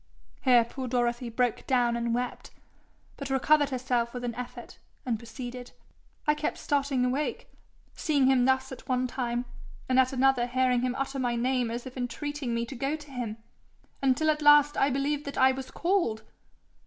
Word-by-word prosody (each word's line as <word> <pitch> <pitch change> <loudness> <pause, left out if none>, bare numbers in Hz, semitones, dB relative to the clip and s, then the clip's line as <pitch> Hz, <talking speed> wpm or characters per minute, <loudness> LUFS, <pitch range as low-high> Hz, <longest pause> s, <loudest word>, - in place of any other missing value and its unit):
Here 245 -3 +5
poor 255 +2 -6
Dorothy 240 0 0
broke 245 0 -1
down 245 -2 +2
and 235 0 -1
wept, 245 +1 -3 0.7
but 280 -1 -6
recovered 285 +2 +3
herself 250 -2 -1
with 245 - -5
an 240 -1 -2
effort, 250 +1 -8 0.3
and 235 -4 -1
proceeded. 245 +1 -8 0.5
'I 300 - +4
kept 300 0 -2
starting 275 -3 0
awake, 270 +4 -2 0.4
seeing 285 -4 +1
him 260 -2 +4
thus 265 0 +1
at 260 - -10
one 255 0 +1
time, 245 -1 -2 0.4
and 255 0 +3
at 260 0 +4
another 265 -2 +2
hearing 250 0 +2
him 250 0 -1
utter 275 0 -3
my 245 -2 0
name 250 0 0
as 235 +2 -5
if 260 0 -9
entreating 250 +1 -3
me 235 0 -1
to 265 - -8
go 275 +5 -1
to 295 -2 -12
him, 235 -4 -4 0.6
until 275 +4 +3
at 305 0 -3
last 295 0 +6
I 275 - +3
believed 280 +2 -1
that 280 - -6
I 260 0 +6
was 260 0 -6
called.' 340 - 0
255 Hz, 180 wpm, -28 LUFS, 245-275 Hz, 0.7 s, last